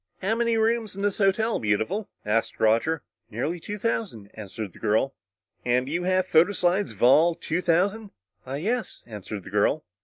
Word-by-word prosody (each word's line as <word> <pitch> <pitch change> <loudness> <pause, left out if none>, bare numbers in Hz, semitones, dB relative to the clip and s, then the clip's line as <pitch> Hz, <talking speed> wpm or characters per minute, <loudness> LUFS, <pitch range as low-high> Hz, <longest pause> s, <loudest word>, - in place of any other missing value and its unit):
"How 200 +4 +1
many 230 0 +1
rooms 225 -2 +1
in 200 - -5
this 205 0 0
hotel, 215 +3 +2
Beautiful?" 110 - -1 0.2
asked 110 +2 0
Roger. 115 +9 +2 0.3
"Nearly 150 +11 -3
two 205 +5 -6
thousand," 195 - -3
answered 105 -2 -7
the - - -15
girl. 110 +6 +1 0.5
"And 125 +1 +1
you 170 +5 -1
have 185 0 +2
photo 175 +2 +4
slides 185 +2 +1
of - - -6
all 160 +7 +6
two 165 +2 -2
thousand?" 195 +5 +1 0.3
"Why, 135 +2 -5
yes," 225 +10 -3
answered 105 -2 -7
the 95 - -11
girl. 105 +9 +1
170 Hz, 175 wpm, -25 LUFS, -, 0.5 s, all